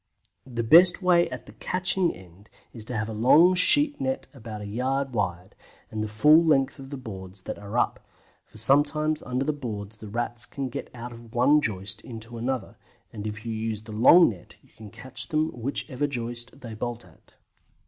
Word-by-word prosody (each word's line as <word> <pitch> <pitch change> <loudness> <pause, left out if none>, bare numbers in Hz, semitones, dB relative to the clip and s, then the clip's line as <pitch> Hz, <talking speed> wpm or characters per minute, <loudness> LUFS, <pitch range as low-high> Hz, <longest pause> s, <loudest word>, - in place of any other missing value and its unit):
The 120 -2 -3
best 175 - +6
way 175 -1 +4
at - - -8
the - - -13
catching 180 0 +1
end 95 +3 -16 0.2
is 115 - -2
to 125 0 -3
have 110 +1 -2
a 110 - -5
long 150 +11 +5
sheet 290 +10 +4
net 265 0 -2
about 110 -5 -8
a - - -6
yard 130 +5 -2
wide, 90 -3 -3 0.4
and 110 -1 -3
the - - -3
full 150 +10 +5
length 140 -3 +2
of 135 0 -10
the 140 - -6
boards 95 -6 -8
that - - -6
are 105 +3 -5
up, - - 0 0.4
for - - -18
sometimes 145 +6 +2
under 125 +1 -2
the 150 - 0
boards 110 -7 -7
the 110 - -10
Rats 120 0 -3
can 135 -2 -5
get - - -6
out 120 +1 -7
of 115 0 -13
one 140 +5 +4
joist 100 -2 -1
into 115 0 -9
another, 130 +1 -3 0.4
and 105 -1 -5
if 110 +1 -7
you 115 - -3
use 110 -1 -4
the 110 - -11
long 130 +11 +7
net 95 -6 -10
you - - -25
can 110 -1 -11
catch 120 +3 -5
them 155 0 0
whichever 135 +3 -3
joist 120 0 -4
they 115 -3 -8
bolt 120 +2 -5
at. - - -23
120 Hz, 200 wpm, -26 LUFS, 110-145 Hz, 0.4 s, long